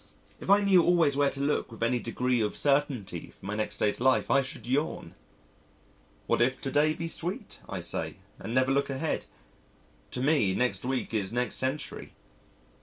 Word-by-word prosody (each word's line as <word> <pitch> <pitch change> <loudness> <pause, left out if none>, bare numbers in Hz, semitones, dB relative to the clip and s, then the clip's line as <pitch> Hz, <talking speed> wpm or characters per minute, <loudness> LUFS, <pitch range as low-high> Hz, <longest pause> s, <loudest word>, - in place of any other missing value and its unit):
If - - -8
I 200 +1 +6
knew 190 -3 +6
always 165 -5 +3
where 140 0 +3
to 135 - -7
look 140 -3 0
with 115 0 -5
any 120 +1 +2
degree 125 +1 0
of 105 -1 -1
certainty 135 - 0
for - - -13
my 105 +1 -3
next 110 0 -2
day's 105 - +1
life 130 +1 +2
I 140 - +5
should 135 +4 -7
yawn! 140 +6 -1 1.1
"What - - +1
if 130 +2 +2
to 135 - -3
day 155 +2 +3
be 165 - -4
sweet," 170 +2 -3
I - - -4
say, - - -2 0.2
and - - -6
never 130 +2 +2
look 140 +1 +1
ahead. 135 +4 -2 0.8
To 125 - -3
me, 130 -10 +2
next 125 0 0
week 130 -2 -2
is 100 -3 -1
next 125 +1 -1
century. 130 +3 -3
130 Hz, 180 wpm, -28 LUFS, 120-145 Hz, 1.1 s, I